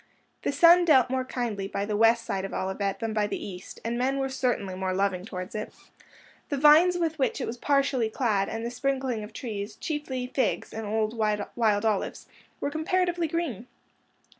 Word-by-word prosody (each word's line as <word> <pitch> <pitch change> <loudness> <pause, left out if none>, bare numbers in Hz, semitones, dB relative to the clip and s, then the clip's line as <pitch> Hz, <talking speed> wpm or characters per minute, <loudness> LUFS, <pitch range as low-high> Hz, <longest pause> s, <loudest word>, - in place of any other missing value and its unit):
The - - 0
sun 340 +5 +7
dealt 260 -6 +5
more 260 0 0
kindly 230 -6 -3
by 200 0 -2
the 210 0 -2
west 230 +2 +4
side 190 -1 -2
of 195 - -5
Olivet 195 +1 -2
than 225 -1 -2
by 210 -1 +1
the - - -3
east, 185 -2 -8
and 235 +1 -1
men 265 +2 +1
were 270 0 -1
certainly 245 -7 -1
more 185 0 -2
loving 190 -1 0
towards 185 -3 -6
it. 215 0 -4 0.8
The 285 - -1
vines 310 +5 +6
with 325 -3 -1
which 260 -3 +1
it - - -2
was 230 - -4
partially 275 -5 +2
clad, 215 -5 0
and 225 +1 -4
the 235 - -3
sprinkling 260 -3 -1
of 210 - -9
trees, 215 -2 -5
chiefly 290 -5 -3
figs 255 +1 -1
and 220 -1 -5
old 220 +1 0
wild 215 0 0
olives, 215 -3 -1 0.3
were 285 - -2
comparatively 345 +2 0
green. 295 - -3
235 Hz, 190 wpm, -27 LUFS, 205-275 Hz, 0.8 s, sun